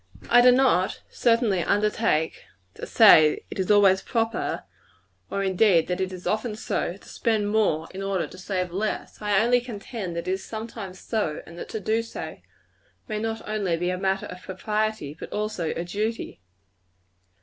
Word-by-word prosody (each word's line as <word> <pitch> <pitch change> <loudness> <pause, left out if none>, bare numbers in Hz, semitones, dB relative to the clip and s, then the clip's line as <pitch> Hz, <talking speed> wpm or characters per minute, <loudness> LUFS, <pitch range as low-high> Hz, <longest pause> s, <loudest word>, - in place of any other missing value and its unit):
I 245 +1 +8
do 250 +1 +8
not, 250 -8 +2
certainly 230 -6 +2
undertake 205 -6 +1 0.3
to - - -8
say 160 -9 +7
that - - -11
it - - -6
is 190 - -1
always 200 -2 +5
proper 225 -1 -1 0.7
or 200 - -1
indeed, 190 -3 +4
that 180 +1 -1
it 190 0 -1
is 180 -1 -9
often 215 0 -1
so 185 -3 -2
to - - -19
spend 215 -3 0
more, 185 -8 +1
in 190 - -6
order 195 -2 -1
to - - -12
save 185 -2 -2
less. 210 +4 -3
I 205 -2 +2
only 245 +1 +3
contend 210 -5 -6
that 170 - -4
it - - +1
is 190 0 -2
sometimes 220 -4 -7
so; 205 -10 -2
and 170 - -12
that - - -7
to 220 - -4
do 220 +3 0
so, 230 - -7 0.7
may 215 -1 -3
not 225 0 -4
only 200 -6 0
be 175 +2 -1
a 180 - -2
matter 195 0 0
of 180 0 -9
propriety, 210 -5 -2
but - - -8
also 210 -6 -2
a 170 - -3
duty. 210 - -3
205 Hz, 180 wpm, -25 LUFS, 185-220 Hz, 0.7 s, I